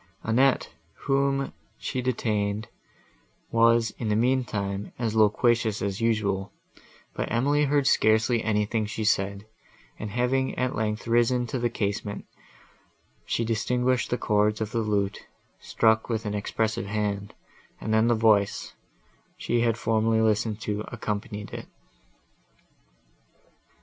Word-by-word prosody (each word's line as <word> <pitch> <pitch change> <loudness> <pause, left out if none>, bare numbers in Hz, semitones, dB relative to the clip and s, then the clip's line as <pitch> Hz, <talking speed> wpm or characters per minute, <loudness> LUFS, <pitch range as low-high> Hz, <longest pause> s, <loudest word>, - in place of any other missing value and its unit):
Annette, 130 +4 +2 0.3
whom 135 0 +1 0.2
she 130 - -3
detained, 110 -4 -1 0.8
was, 115 -1 +4
in 110 - -2
the 105 - +2
meantime, 105 -5 0
as 115 -2 -2
loquacious 110 0 +3
as 100 +1 -3
usual; 105 -4 0 0.6
but - - -3
Emily 145 +6 +2
heard 145 0 +2
scarcely 110 -1 +3
anything 105 0 0
she 110 +1 -4
said, 100 -1 0 0.5
and 105 - -4
having 125 +4 0
at 125 0 0
length 110 0 -2
risen 120 +1 +2
to 125 +2 -3
the 120 0 +1
casement, 100 -2 -3 1.0
she 115 - 0
distinguished 125 +3 0
the 125 - 0
chords 105 -1 +1
of 110 -1 -3
the 115 - 0
lute, 105 -2 -1 0.3
struck 110 0 +2
with 110 -1 -2
an 105 - -2
expressive 105 0 -1
hand, 100 -1 -2 0.4
and 110 - -2
then 110 +1 +4
the 120 - +3
voice, 110 -3 +2 0.6
she 120 - 0
had 115 -1 +1
formerly 110 0 +1
listened 110 0 +1
to, 105 0 -2
accompanied 105 -3 -5
it. - - -7
110 Hz, 125 wpm, -26 LUFS, 105-120 Hz, 1.0 s, was